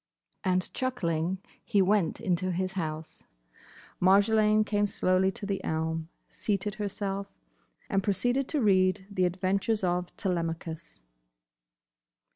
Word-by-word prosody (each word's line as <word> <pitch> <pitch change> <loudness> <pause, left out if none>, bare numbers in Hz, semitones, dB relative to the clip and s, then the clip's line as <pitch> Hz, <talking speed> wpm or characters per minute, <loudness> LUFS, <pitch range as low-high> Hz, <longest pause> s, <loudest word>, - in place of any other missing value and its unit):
And 185 0 0
chuckling 180 -9 -1 0.3
he 210 -4 +1
went 195 -3 +2
into 185 -3 0
his 185 +1 -1
house. 160 -4 -5 0.8
Marjolaine 215 +3 +5
came 205 -1 +1
slowly 185 -1 +2
to 230 -3 -6
the 200 -1 -2
elm, 160 0 -2 0.2
seated 205 0 -2
herself, 200 -1 -3 0.6
and 195 - +1
proceeded 245 +7 +1
to 300 -3 0
read 185 -2 +3
the 185 -2 +2
"Adventures 195 +4 0
of 180 0 +1
Telemachus." 165 - -3
190 Hz, 110 wpm, -29 LUFS, 180-205 Hz, 0.8 s, Marjolaine